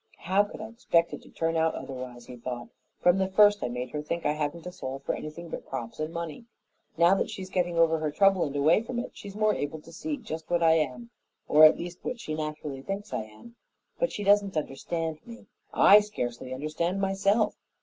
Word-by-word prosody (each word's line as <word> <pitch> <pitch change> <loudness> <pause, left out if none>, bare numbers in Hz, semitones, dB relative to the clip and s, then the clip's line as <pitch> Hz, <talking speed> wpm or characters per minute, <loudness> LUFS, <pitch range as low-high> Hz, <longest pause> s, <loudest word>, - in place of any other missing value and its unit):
"How 190 +4 +3
could 205 - -9
I 215 - -5
expect 225 -8 +1
it - - -6
to - - -17
turn 165 0 -1
out 160 0 +2
otherwise?" 125 -2 -7
he 125 - -9
thought. 120 0 -6 0.3
"From 175 +2 +4
the 190 - +2
first 205 +1 +5
I - - 0
made 125 +1 -4
her 150 - -3
think 170 +3 -4
I 150 - +3
hadn't 150 +2 -3
a 180 - -5
soul 135 -7 -5
for 140 - -3
anything 165 +3 -7
but - - -7
crops 120 -2 -6
and 155 +1 -2
money. 170 +5 -6 0.5
Now 170 +3 +6
that 195 - 0
she's 185 -1 -7
getting 175 -2 0
over 165 -1 +4
her 155 -1 -1
trouble 195 +4 +4
and 145 -1 -5
away 155 +8 +4
from 240 +1 -5
it, 240 - -3
she's 200 -1 -10
more 215 0 +3
able 145 +2 -3
to 165 - -14
see 300 - -4
just 160 - -7
what 175 -1 +2
I 165 - +6
am, 125 -7 -1 0.4
or 155 +1 +8
at 155 - +7
least 175 +1 -7
what 245 - -4
she 155 - -5
naturally 150 -3 -4
thinks 195 +5 -5
I 110 - -2
am. 110 - -15 0.4
But - - +1
she 205 - -4
doesn't 200 -3 +3
understand 160 +2 -3
me 235 -2 -12 0.3
I 205 - +8
scarcely 130 - -4
understand 155 +7 -2
myself. 195 +3 +2
165 Hz, 220 wpm, -28 LUFS, 150-195 Hz, 0.5 s, or